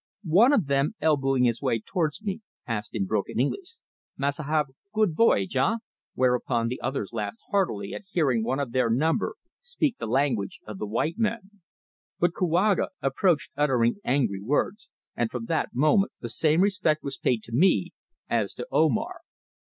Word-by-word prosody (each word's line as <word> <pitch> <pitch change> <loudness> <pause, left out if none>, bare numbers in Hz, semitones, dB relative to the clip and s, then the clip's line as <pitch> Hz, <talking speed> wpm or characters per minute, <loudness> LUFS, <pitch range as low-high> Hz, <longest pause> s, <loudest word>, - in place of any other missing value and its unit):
One 195 - +5
of 220 - +3
them, 140 +7 +1
elbowing 135 -4 +2
his 120 -2 +1
way 115 - +1
towards 160 - -2
me, 205 +1 -3 0.2
asked 110 -2 -4
in 100 -3 0
broken 105 +3 -2
English: 355 - -2 0.4
"Massa 140 +2 -1
have 150 -1 0 0.2
good 215 -7 +2
voyage 100 - +3
eh?" 135 - +3 0.4
whereupon 125 -2 +1
the 125 - -5
others 125 -6 -3
laughed 105 -1 -3
heartily 110 - 0
at - - -7
hearing 135 -11 +1
one 130 +4 -1
of 140 -4 -2
their 130 -1 +2
number 150 +8 +1 0.2
speak 320 - -2
the - - -4
language 120 -5 0
of 105 -3 -8
the 105 - -3
white 150 - -1
men. 210 -3 -2 0.6
But 175 0 +2
Kouaga 180 +3 +2
approached 150 +4 +1
uttering 130 -4 +2
angry 120 -7 0
words, 150 - -1 0.3
and 120 -1 0
from 120 -1 -5
that - - 0
moment 155 +9 +3
the 120 - -5
same 155 +8 +3
respect 185 -6 +1
was 140 -1 -5
paid 120 -4 0
to 115 - -7
me 180 +3 +3 0.4
as - - -1
to - - -5
Omar. - - +1
140 Hz, 170 wpm, -26 LUFS, 120-180 Hz, 0.6 s, One